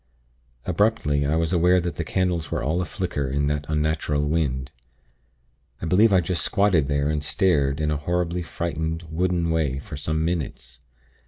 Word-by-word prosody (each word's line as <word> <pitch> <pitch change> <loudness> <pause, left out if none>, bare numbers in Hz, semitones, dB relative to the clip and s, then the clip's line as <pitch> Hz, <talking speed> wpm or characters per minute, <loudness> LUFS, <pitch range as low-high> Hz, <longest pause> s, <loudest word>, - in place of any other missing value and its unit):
"Abruptly, 85 -7 +1
I 75 - +1
was 80 +2 0
aware 90 +1 +4
that 85 0 -3
the 85 - -1
candles 85 -2 -1
were - - -1
all 80 +7 0
a - - -2
flicker 75 -4 -3
in 70 +2 0
that 75 0 -1
unnatural 75 -1 0
wind.... 65 -5 -1 1.1
I - - -5
believe 100 +7 +4
I 95 -2 +5
just 85 +1 -1
squatted 100 -8 +2
there 70 0 0
and 75 -1 -1
stared 70 -5 +1
in 75 0 0
a 75 - 0
horribly 90 +3 -1
frightened, 80 -1 -3
wooden 85 0 0
way 75 -5 0
for 70 - -7
some 80 +2 -1
minutes. 80 -7 -4
80 Hz, 170 wpm, -24 LUFS, 75-90 Hz, 1.1 s, I